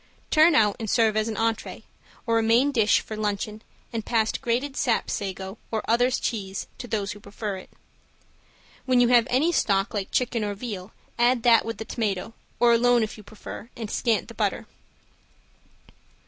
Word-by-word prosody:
Turn 315 Hz, 0 st, +6 dB
out 210 Hz, -2 st, +3 dB
and 220 Hz, -2 st, -4 dB
serve 225 Hz, -1 st, +3 dB
as 215 Hz, 0 st, +1 dB
an 220 Hz, -, -4 dB
entree, 225 Hz, -1 st, -2 dB, 0.4 s
or 230 Hz, -1 st, +2 dB
a -, -, +2 dB
main 235 Hz, +6 st, +3 dB
dish 225 Hz, -6 st, +3 dB
for 215 Hz, -, -7 dB
luncheon 215 Hz, 0 st, -3 dB, 0.3 s
and 225 Hz, -1 st, -2 dB
pass 225 Hz, -1 st, +1 dB
grated 265 Hz, +3 st, -2 dB
sap 235 Hz, -3 st, 0 dB
sago 190 Hz, +1 st, -5 dB
or 220 Hz, -1 st, -2 dB
other 240 Hz, +2 st, +3 dB
cheese 200 Hz, -6 st, -3 dB
to 245 Hz, -, -6 dB
those 205 Hz, -3 st, -2 dB
who 205 Hz, -, -9 dB
prefer 205 Hz, 0 st, -5 dB
it. 185 Hz, -, -12 dB, 1.2 s
When 255 Hz, -1 st, +3 dB
you 245 Hz, -1 st, +4 dB
have 240 Hz, -1 st, +5 dB
any 290 Hz, +7 st, +2 dB
stock 200 Hz, -, +1 dB
like 200 Hz, -2 st, -3 dB
chicken 245 Hz, -3 st, 0 dB
or 205 Hz, -1 st, -2 dB
veal, 200 Hz, -3 st, -6 dB, 0.3 s
add 240 Hz, 0 st, +3 dB
that 235 Hz, -2 st, +5 dB
with 230 Hz, 0 st, -4 dB
the 220 Hz, -, -6 dB
tomato 215 Hz, -2 st, -3 dB, 0.3 s
or 240 Hz, -1 st, +5 dB
alone 240 Hz, 0 st, +4 dB
if 215 Hz, -, -4 dB
you 215 Hz, -, -13 dB
prefer 215 Hz, +2 st, -10 dB
and 225 Hz, -3 st, -5 dB
scant 230 Hz, -3 st, 0 dB
the -, -, -10 dB
butter. -, -, -1 dB
225 Hz, 180 wpm, -25 LUFS, 210-240 Hz, 1.2 s, Turn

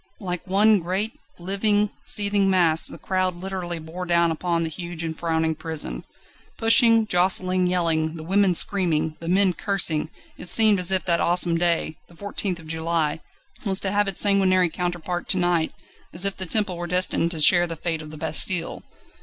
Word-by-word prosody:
Like 180 Hz, -2 st, -6 dB
one 205 Hz, +2 st, +3 dB
great, 190 Hz, +6 st, -3 dB, 0.3 s
living, 205 Hz, +3 st, -1 dB, 0.2 s
seething 200 Hz, -2 st, +3 dB
mass 170 Hz, -4 st, +3 dB
the -, -, -6 dB
crowd 185 Hz, -1 st, -2 dB
literally 180 Hz, -1 st, -6 dB
bore 165 Hz, +3 st, -8 dB
down 170 Hz, -1 st, +1 dB
upon 170 Hz, +1 st, -2 dB
the 165 Hz, -, -4 dB
huge 170 Hz, +1 st, -7 dB
and 160 Hz, -1 st, -5 dB
frowning 160 Hz, -1 st, -2 dB
prison. 155 Hz, -, -5 dB, 0.5 s
Pushing, 230 Hz, 0 st, +3 dB
jostling, 185 Hz, -1 st, +1 dB
yelling, 165 Hz, -3 st, -1 dB
the 160 Hz, -, -9 dB
women 190 Hz, +1 st, +1 dB
screaming, 165 Hz, -5 st, +1 dB
the 165 Hz, -, -7 dB
men 190 Hz, 0 st, +2 dB
cursing, 170 Hz, -6 st, -1 dB, 0.3 s
it 180 Hz, -, -2 dB
seemed 215 Hz, -1 st, +8 dB
as 180 Hz, +1 st, +4 dB
if 190 Hz, -1 st, 0 dB
that 170 Hz, -2 st, 0 dB
awesome 175 Hz, -1 st, +3 dB
day 165 Hz, -2 st, -1 dB
the 170 Hz, -, -20 dB
14th 200 Hz, 0 st, -5 dB
of 165 Hz, -, -13 dB
July 160 Hz, -1 st, -2 dB, 0.4 s
was 195 Hz, -3 st, +4 dB
to 190 Hz, -, -3 dB
have 205 Hz, 0 st, 0 dB
its 195 Hz, -, -3 dB
sanguinary 185 Hz, -3 st, +2 dB
counterpart 175 Hz, 0 st, -5 dB
to 190 Hz, -, +1 dB
night, 175 Hz, -3 st, 0 dB, 0.4 s
as 180 Hz, +3 st, +2 dB
if 200 Hz, -, 0 dB
the 190 Hz, -, -3 dB
Temple 200 Hz, -1 st, 0 dB
were 175 Hz, 0 st, -6 dB
destined 180 Hz, -1 st, +1 dB
to 165 Hz, -2 st, -5 dB
share 175 Hz, +3 st, +5 dB
the 165 Hz, -, -6 dB
fate 165 Hz, 0 st, -4 dB
of 155 Hz, -, -11 dB
the 155 Hz, -, -11 dB
Bastille. 160 Hz, +3 st, 0 dB
180 Hz, 180 wpm, -22 LUFS, 165-195 Hz, 0.5 s, seemed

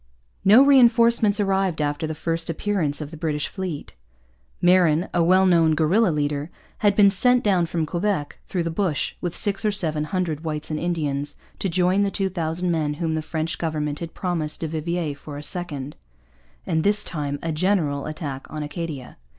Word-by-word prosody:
No 215 Hz, +7 st, +7 dB
reinforcements 235 Hz, -5 st, +5 dB
arrived 195 Hz, -4 st, 0 dB
after 145 Hz, +1 st, -1 dB
the 160 Hz, -, -4 dB
first 165 Hz, +1 st, -2 dB
appearance 165 Hz, -4 st, -1 dB
of 150 Hz, 0 st, -6 dB
the 160 Hz, -, -9 dB
British 150 Hz, -2 st, -2 dB
fleet. 180 Hz, -, -6 dB, 0.6 s
Marin, 175 Hz, -2 st, +4 dB
a 170 Hz, -, +3 dB
well 185 Hz, +3 st, +4 dB
known 165 Hz, -3 st, +4 dB
guerilla 180 Hz, +8 st, +3 dB
leader, 145 Hz, -1 st, -1 dB, 0.3 s
had 205 Hz, -2 st, +3 dB
been 200 Hz, -1 st, +6 dB
sent 245 Hz, +5 st, +3 dB
down 185 Hz, -5 st, +2 dB
from 165 Hz, -1 st, -1 dB
Quebec, 170 Hz, -2 st, -2 dB
through 180 Hz, -3 st, -1 dB
the 165 Hz, -, -2 dB
bush, 165 Hz, -3 st, -1 dB
with 175 Hz, -2 st, -3 dB
six 200 Hz, 0 st, 0 dB
or 215 Hz, -, +2 dB
seven 155 Hz, -6 st, -1 dB
hundred 160 Hz, -2 st, -2 dB
whites 155 Hz, -1 st, -4 dB
and 155 Hz, -, -2 dB
Indians, 145 Hz, -4 st, -2 dB, 0.2 s
to 195 Hz, -, -1 dB
join 180 Hz, +3 st, +2 dB
the 200 Hz, -, +2 dB
two 195 Hz, 0 st, -1 dB
thousand 175 Hz, 0 st, -2 dB
men 155 Hz, -3 st, -1 dB
whom 165 Hz, 0 st, -2 dB
the 160 Hz, -, -1 dB
French 160 Hz, +1 st, -3 dB
government 150 Hz, -3 st, -2 dB
had 165 Hz, -1 st, -7 dB
promised 165 Hz, -5 st, -2 dB
du 165 Hz, -, -1 dB
Vivier 160 Hz, 0 st, -2 dB
for 145 Hz, +1 st, -9 dB
a 145 Hz, -, -7 dB
second, 150 Hz, -5 st, -4 dB, 0.7 s
and 160 Hz, -1 st, 0 dB
this 205 Hz, +1 st, +4 dB
time 145 Hz, -3 st, -3 dB
a 165 Hz, -, -1 dB
general, 155 Hz, -4 st, 0 dB
attack 150 Hz, -4 st, -6 dB
on 155 Hz, -1 st, -5 dB
Acadia. 150 Hz, -4 st, -6 dB
165 Hz, 185 wpm, -23 LUFS, 150-190 Hz, 0.7 s, No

